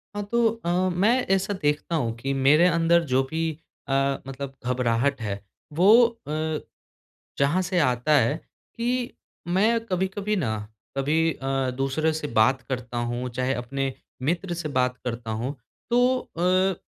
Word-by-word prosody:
हाँ, 205 - -2
तो 235 -1 +4 0.2
अ, - - 0 0.2
मैं 200 +8 +3 0.2
ऐसा 195 +2 -1
देखता 150 +3 0
हूँ 115 -7 -1
कि 135 +4 -2
मेरे 145 +6 +5
अंदर 170 0 +3
जो 130 - +4
भी 160 +2 -2 0.5
अ, - - -4 0.4
मतलब 135 0 -6
घबराहट 125 +1 +1
है, 100 -2 -3 0.3
वो 205 +9 +7
अ, 155 -9 -3 0.8
जहाँ 145 +7 +3
से 180 0 0
आता 125 -1 +1
है 120 +4 +2 0.4
कि 245 +1 -1 0.3
मैं 210 +6 +3
कभी-कभी 195 +2 -1
ना 115 - -1 0.4
कभी 160 +4 +2
अ, 135 -1 -1
दूसरे 135 +4 0
से 155 -1 -3
बात 130 +4 +4
करता 125 -2 -4
हूँ, 120 +1 -2
चाहे 130 +2 -1
अपने 135 +2 -3 0.3
मित्र 175 +6 -1
से 170 -2 -4
बात 125 0 +1
करता 115 -2 -4
हूँ। 120 +6 -3 0.3
तो 250 +2 +3
अ, 185 +1 +1
150 Hz, 150 wpm, -25 LUFS, 130-185 Hz, 0.8 s, वो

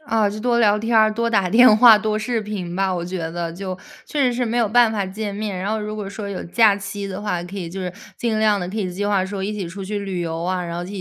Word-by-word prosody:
啊， 225 -8 +1
就 210 +1 -6
多 240 0 +1
聊 210 -3 +4
天 225 +1 0
儿、 215 0 +4
多 230 +1 -1
打 200 -5 +2
电 225 +2 +7
话、 225 -1 +8
多 215 0 -1
视 225 +1 -1
频 195 -5 -5
吧， 190 0 0
我 175 -2 -3
觉 180 +1 -4
得 170 0 -4
就， 185 0 -6 0.3
确 285 -3 0
实 250 - +2
是 245 +1 -1
没 235 +1 -2
有 230 -3 +2
办 235 0 +5
法 200 -3 -2
见 205 +2 -5
面， 205 -2 -4
然 190 +3 -3
后 220 - 0
如 210 0 -5
果 205 -2 -5
说 200 0 -6
有 195 - -5
假 215 +3 +4
期 200 0 -6
的 195 +1 -6
话， 180 -5 -1
可 190 +3 -9
以 175 -3 -4
就 190 +2 -6
是 180 -1 -4 0.2
尽 225 -2 -1
量 210 -2 +3
地 180 -2 -4
可 205 - -6
以 185 -3 -2
计 205 +3 -2
划 195 -2 +1
说 195 0 -4
一 210 - -2
起 195 -5 -4
出 190 +2 -7
去 205 +2 -3
旅 195 -3 -4
游 165 -1 -3
啊， 180 0 -1
然 170 0 -5
后 175 - -3
一 - - -7
205 Hz, 320 characters per minute, -21 LUFS, 185-220 Hz, 0.3 s, 话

